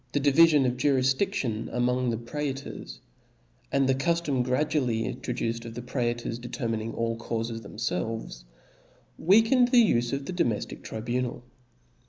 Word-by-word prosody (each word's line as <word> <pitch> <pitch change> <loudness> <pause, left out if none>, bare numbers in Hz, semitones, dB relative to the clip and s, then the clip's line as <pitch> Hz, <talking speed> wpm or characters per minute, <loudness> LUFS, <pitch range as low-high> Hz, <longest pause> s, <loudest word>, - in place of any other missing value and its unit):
^^^ 145 - +2
divifion 145 0 +5
of 125 0 0
jurifdidtion 130 - +1
among 125 +1 +1
the 115 - -1
praetors, 135 - -5 0.7
and 140 -1 +2
the 135 - +4
cuftom 145 -1 0
gradually 125 -3 0
introduced 115 -2 -3
of 115 -1 -8
the 120 - -5
praetors 120 -2 -2
determining 115 -2 -3
all 115 0 -1
caufes 115 0 -3
themfelves 100 - -4 0.4
*, - - -33
weakened 225 +7 +5
the 240 -3 +5
ufe 120 0 0
of 140 0 -3
the 185 - -4
domeftic 120 - -1
tribunal. 120 +2 -3
125 Hz, 135 wpm, -27 LUFS, 115-140 Hz, 0.7 s, divifion